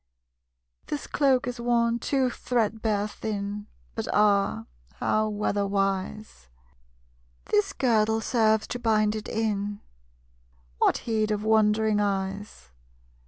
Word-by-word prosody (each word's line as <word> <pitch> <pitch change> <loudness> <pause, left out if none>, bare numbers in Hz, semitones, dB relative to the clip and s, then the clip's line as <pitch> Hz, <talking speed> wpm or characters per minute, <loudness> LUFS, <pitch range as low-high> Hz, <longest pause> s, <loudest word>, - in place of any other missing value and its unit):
_ - - -34
This 295 - -4
cloak 270 -3 +2
is 245 0 -4
worn 235 -1 +1
too 260 0 +1
threadbare 220 -4 -1
thin, 205 -1 -5 0.3
But - - -4
ah, 200 - +2 0.3
how 215 0 0
weatherwise! 200 - -2 1.0
This 210 - +1
girdle 220 -3 +2
serves 220 -2 +2
to 245 - -4
bind 215 -2 +2
it 215 - -6
in; 205 -2 -2 1.0
What - - +3
heed 220 -2 0
of 210 -1 -1
wondering 215 -1 +3
eyes? 195 - -3
215 Hz, 110 wpm, -26 LUFS, 205-225 Hz, 1.0 s, What